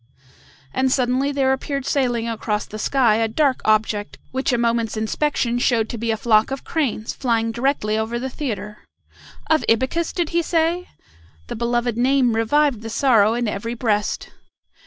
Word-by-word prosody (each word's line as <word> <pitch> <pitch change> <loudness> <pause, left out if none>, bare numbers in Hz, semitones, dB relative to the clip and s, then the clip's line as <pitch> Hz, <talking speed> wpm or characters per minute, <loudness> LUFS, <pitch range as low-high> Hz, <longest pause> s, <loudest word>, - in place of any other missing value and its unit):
And 260 0 +1
suddenly 260 +2 +1
there 270 -2 +2
appeared 275 0 -3
sailing 245 -5 0
across 215 -2 -2
the 215 - -8
sky 235 -3 +3
a 225 0 +1
dark 265 +3 +1
object 215 -1 +1
which 265 +1 -1
a 245 - +2
moment's 230 -2 0
inspection 240 +1 0
showed 230 -3 +1
to 235 - -4
be 230 +1 -2
a 220 - +1
flock 215 -1 +3
of 270 0 -5
cranes 260 -9 -2
flying 230 -3 0
directly 225 -3 0
over 225 +2 -2
the 255 +2 -3
theatre. 220 -6 -5 0.7
"Of 315 -1 +2
Ibycus! 260 +9 +1
did 345 -3 -1
he 340 0 +1
say?" 335 +2 0 0.6
The - - -4
beloved 240 0 -1
name 255 -1 +3
revived 255 +2 +2
the 225 - -6
sorrow 225 -3 +3
in 240 -1 -1
every 215 +3 -3
breast. 210 -3 -1
240 Hz, 165 wpm, -21 LUFS, 225-270 Hz, 0.7 s, sky